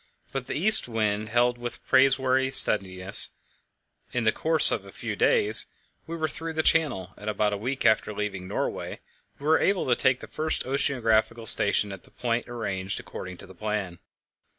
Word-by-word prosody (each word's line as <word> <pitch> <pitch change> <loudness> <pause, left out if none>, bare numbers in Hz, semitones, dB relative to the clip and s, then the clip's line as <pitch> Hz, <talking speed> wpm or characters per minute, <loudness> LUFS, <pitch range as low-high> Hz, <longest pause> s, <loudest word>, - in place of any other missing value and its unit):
But 135 -2 -5
the - - -4
east 215 - +7
wind 110 -2 -1
held 120 +1 +1
with 120 0 -7
praiseworthy 130 0 +3
steadiness. 95 -6 +1 0.8
In 125 - -1
the 110 - +3
course 160 +5 +3
of - - -2
a - - -13
few - - -5
days 430 -4 +2 0.4
we 165 +1 -5
were 160 -1 -1
through 165 +1 -5
the 160 0 -1
Channel, 125 - +1
and 105 - -5
about 105 -1 0
a - - -2
week 130 +6 -3
after 110 0 +3
leaving 100 -3 -4
Norway - - -4 0.4
we 140 - -11
were 160 +1 +4
able 195 -1 +1
to 125 - +2
take 130 0 +2
the - - -9
first 155 0 -3
oceanographical 115 -4 +1
station 100 0 +2
at 95 - -8
the - - -20
point 120 -1 -3
arranged 100 -5 -4
according 95 -1 -8
to - - -12
the 95 - -14
plan. 100 -3 -4
120 Hz, 180 wpm, -26 LUFS, 105-135 Hz, 0.8 s, east